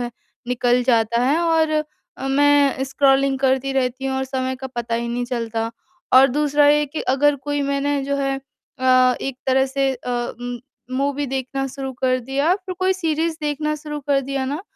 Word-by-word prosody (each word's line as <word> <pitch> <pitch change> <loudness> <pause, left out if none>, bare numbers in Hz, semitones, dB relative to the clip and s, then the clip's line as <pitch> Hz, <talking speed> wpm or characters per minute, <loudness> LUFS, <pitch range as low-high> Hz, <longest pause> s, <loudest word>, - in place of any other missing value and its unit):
है 240 0 -3 0.4
निकल 245 0 +2
जाता 235 -1 +2
है 285 +6 +2
और 320 -2 +2 0.5
मैं 285 -1 +3
स्क्रॉलिंग 270 0 +2
करती 265 0 +1
रहती 260 0 -1
हूँ 265 0 -1
और 265 - -1
समय 260 0 -3
का 265 +1 -6
पता 240 -2 -4
ही 235 0 -2
नहीं 245 +1 -2
चलता 230 -2 -3 0.4
और 265 +1 +9
दूसरा 290 +2 +2
ये 295 0 +4
कि 295 +3 -5
अगर 290 +2 +3
कोई 290 +1 -2
मैंने 280 0 0
जो 280 0 -1
है 275 -1 -1 0.4
अ, 255 -1 +4
एक 270 -2 -4
तरह 265 0 +3
से 270 0 0
अ, 250 - -10 0.3
म 245 0 -5 0.3
मूवी 280 +2 -1
देखना 270 +1 -3
शुरू 270 0 -6
कर 255 -1 +1
दिया, 275 +7 +1
फ़िर 375 -1 -6
कोई 370 0 +2
सीरीज़ 325 -2 -1
देखना 300 +1 -1
शुरू 300 0 -6
कर 280 -1 +1
दिया 270 0 -3
ना 290 +5 -3
270 Hz, 185 wpm, -21 LUFS, 255-290 Hz, 0.5 s, और